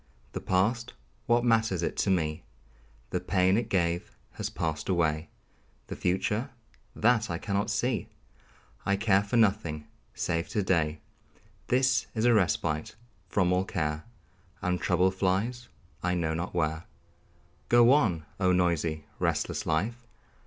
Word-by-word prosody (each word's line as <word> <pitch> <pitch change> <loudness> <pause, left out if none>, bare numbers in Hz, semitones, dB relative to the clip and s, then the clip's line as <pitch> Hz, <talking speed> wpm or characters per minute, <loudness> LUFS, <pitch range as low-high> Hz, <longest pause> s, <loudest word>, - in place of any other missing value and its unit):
The - - -5
past 115 +7 0 0.3
what 120 0 +3
matters 110 -6 +2
it - - -1
to - - +1
me? 80 -4 0 0.7
The - - 0
pain 95 0 +2
it 115 0 -1
gave 85 -3 0 0.2
has - - -4
passed 80 +2 -3
away. 80 -4 +1 0.6
The - - -4
future 105 +7 0 0.5
that 115 -2 +2
I 85 - -2
cannot 100 +4 -1
see! 120 +1 0 0.8
I 100 - +2
care 100 -1 +3
for 105 +4 -1
nothing 95 -9 +1 0.3
save 85 0 -1
to 105 - 0
day 80 -4 +1 0.7
This 130 0 +2
is 110 +1 +1
a 120 - +6
respite 80 -6 0 0.3
from 90 -2 +2
all 90 +1 +2
care, 75 -6 -2 0.6
And 90 -3 -1
trouble 90 +1 +3
flies 100 +6 -1 0.3
I 90 0 0
know 80 -2 0
not 90 +2 -4
where. 80 -1 -1 0.8
Go 120 +1 +6
on, 100 - +2
oh, 95 -2 +3
noisy, 85 -4 +1
restless - - -1
life! 110 +10 -1
95 Hz, 140 wpm, -28 LUFS, 85-110 Hz, 0.8 s, a